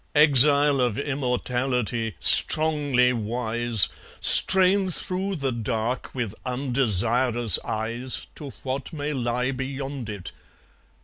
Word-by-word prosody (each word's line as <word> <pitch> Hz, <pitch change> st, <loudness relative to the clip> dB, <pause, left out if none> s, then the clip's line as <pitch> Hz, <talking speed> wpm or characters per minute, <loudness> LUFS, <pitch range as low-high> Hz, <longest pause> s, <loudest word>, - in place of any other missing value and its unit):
Exile 145 Hz, -1 st, +3 dB
of 120 Hz, -4 st, -3 dB
immortality, 125 Hz, -, -4 dB
strongly 145 Hz, -5 st, +3 dB
wise, 115 Hz, -1 st, +1 dB, 0.3 s
Strain 190 Hz, 0 st, +6 dB
through 190 Hz, +2 st, -4 dB
the 140 Hz, -5 st, -5 dB
dark 115 Hz, +2 st, -6 dB
with 120 Hz, -6 st, -6 dB
undesirous 120 Hz, -2 st, +1 dB
eyes 115 Hz, +4 st, -4 dB
To 145 Hz, -3 st, -11 dB
what 135 Hz, +3 st, -7 dB
may 150 Hz, -1 st, -6 dB
lie 125 Hz, 0 st, -4 dB
beyond 135 Hz, -1 st, -8 dB
it. 100 Hz, -4 st, -9 dB
125 Hz, 100 wpm, -21 LUFS, 120-140 Hz, 0.3 s, Strain